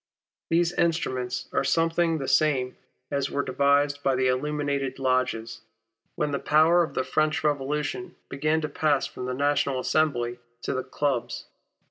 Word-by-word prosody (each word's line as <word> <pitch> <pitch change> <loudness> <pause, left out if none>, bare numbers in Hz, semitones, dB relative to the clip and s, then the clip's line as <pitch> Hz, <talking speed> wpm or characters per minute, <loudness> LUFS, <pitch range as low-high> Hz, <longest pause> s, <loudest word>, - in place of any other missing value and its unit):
These 170 +1 +2
instruments 130 -7 -1
are - - +1
something 165 0 +2
the 135 -3 -4
same 135 -5 +2 0.4
as 140 -1 -1
were 140 - -1
devised 140 +2 +2
by 135 -2 +1
the 130 0 +2
illuminated 140 0 -1
lodges, 130 -3 -1 0.5
when 150 - -1
the 140 - -1
power 160 +3 +4
of 165 - -2
the 130 - +1
French 155 +4 0
Revolution 150 - -2
began 155 +3 0
to 150 - -2
pass 150 -2 +1
from 125 - -6
the 125 - -2
National 140 -1 +1
Assembly 125 -4 0 0.2
to - - -1
the 130 0 -2
clubs. 130 -2 -2
140 Hz, 150 wpm, -26 LUFS, 130-155 Hz, 0.5 s, power